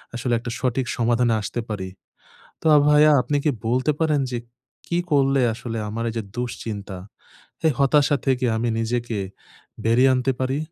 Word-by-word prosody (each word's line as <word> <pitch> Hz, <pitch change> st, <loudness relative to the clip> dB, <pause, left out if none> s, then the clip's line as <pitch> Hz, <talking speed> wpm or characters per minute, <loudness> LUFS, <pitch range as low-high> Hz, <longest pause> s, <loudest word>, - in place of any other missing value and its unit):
আসলে 120 Hz, 0 st, -1 dB
একটা 120 Hz, 0 st, -6 dB
সঠিক 130 Hz, 0 st, 0 dB
সমাধানে 120 Hz, 0 st, +2 dB
আসতে 110 Hz, +4 st, -3 dB
পারি? 95 Hz, -3 st, -4 dB, 0.7 s
তো -, -, -5 dB
আ -, -, +7 dB
ভাইয়া 150 Hz, +1 st, +6 dB
আপনি 145 Hz, -, -1 dB
কি 150 Hz, -, +3 dB, 0.2 s
বলতে 130 Hz, +5 st, +1 dB
পারেন 155 Hz, -3 st, +2 dB
যে 120 Hz, -, -1 dB, 0.5 s
কি 170 Hz, -, -1 dB
করলে 135 Hz, -2 st, +3 dB
আসলে 115 Hz, -1 st, -5 dB
আমার 115 Hz, +2 st, -4 dB
এই -, -, -9 dB
যে -, -, -2 dB
দুশ্চিন্তা, 105 Hz, -5 st, -5 dB, 0.7 s
এই 155 Hz, -, +4 dB
হতাশা 145 Hz, +1 st, +4 dB
থেকে 130 Hz, -1 st, +1 dB
আমি 120 Hz, +1 st, -1 dB
নিজেকে 115 Hz, -1 st, -2 dB, 0.7 s
বেরিয়ে 125 Hz, +4 st, +4 dB
আনতে 130 Hz, +1 st, +1 dB
পারি? 130 Hz, +2 st, 0 dB
125 Hz, 160 wpm, -23 LUFS, 115-135 Hz, 0.7 s, আ